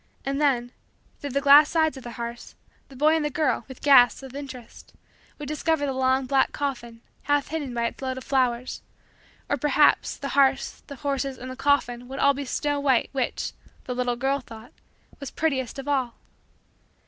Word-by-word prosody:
And 275 +1 -1
then, 245 -4 +1 0.5
through 285 - -5
the 280 +1 -1
glass 285 +2 +7
sides 315 -2 +1
of 265 - -9
the 240 - -8
hearse, 235 0 -7 0.3
the 270 - -14
boy 305 +4 +3
and 320 - 0
the 295 - 0
girl, 300 0 0
with 260 -2 -12
gasps 270 -2 +6
of 265 -1 -10
interest, 270 -4 -10 0.4
would 295 - -7
discover 305 0 0
the 270 - -2
long 260 0 +1
black 270 +1 +2
coffin 240 -5 -4 0.2
half 290 -1 +1
hidden 295 -4 -3
by 235 -1 -1
its 235 - -4
load 260 -1 -3
of 260 - -7
flowers; 250 -2 0 0.7
or, 285 - 0
perhaps, 295 +2 +3
the 275 - -5
hearse, 270 -1 +2
the 280 - -8
horses, 275 -1 -3
and 255 +1 -8
the - - -7
coffin, 250 -3 0
would 265 +1 -7
all 280 0 +4
be 280 +1 -5
snow 290 +2 -1
white 270 -4 +2
which, 265 -3 -2 0.3
the 250 - -4
little 250 -1 -1
girl 270 +3 0
thought, 230 -2 -12 0.5
was 280 -3 -6
prettiest 270 -7 -2
of 275 +1 -7
all. 260 -5 0
270 Hz, 190 wpm, -25 LUFS, 250-285 Hz, 0.7 s, glass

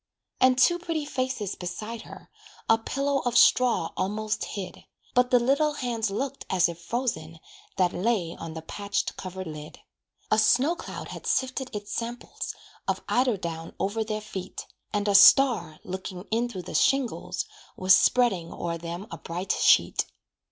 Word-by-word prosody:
And 255 0 +5
two 345 +7 +4
pretty 325 -3 -3
faces 255 -8 -2
beside 215 +6 -6
her, - - -12 0.4
A 225 - +4
pillow 275 +4 -1
of 245 -2 0
straw 245 -10 +4
almost 215 +2 -2
hid, 195 -3 -7 0.3
But 250 0 +3
the 250 - +5
little 280 +5 +2
hands 235 -6 -2
looked 270 +7 -3
as 180 -2 +3
if 170 0 -7
frozen 175 -8 -3 0.4
That 180 -2 +2
lay 185 -4 0
on 165 -1 -8
the 160 - -6
patched 200 +4 -3
cover 185 0 -6
lid. 150 -2 -8 0.5
A - - +5
snow 270 +9 +4
cloud - - -8
had - - -7
sifted 260 0 0
its 205 0 -6
samples, 240 +1 -5 0.3
Of - - -1
eider 250 -3 +2
down 165 -2 -6
over 205 +4 0
their 215 0 -3
feet, 190 -3 -7 0.3
And 205 -1 -1
a 205 - +3
star, 195 - +6
looking 185 0 -6
in 235 +2 +1
through 185 -6 -6
the - - -8
shingles, 275 - +1 0.3
Was 185 +1 +6
spreading 195 -10 +2
o'er 170 -1 -4
them 170 +3 -6
a - - -7
bright 180 +3 -3
sheet. - - +4
215 Hz, 160 wpm, -27 LUFS, 180-250 Hz, 0.5 s, star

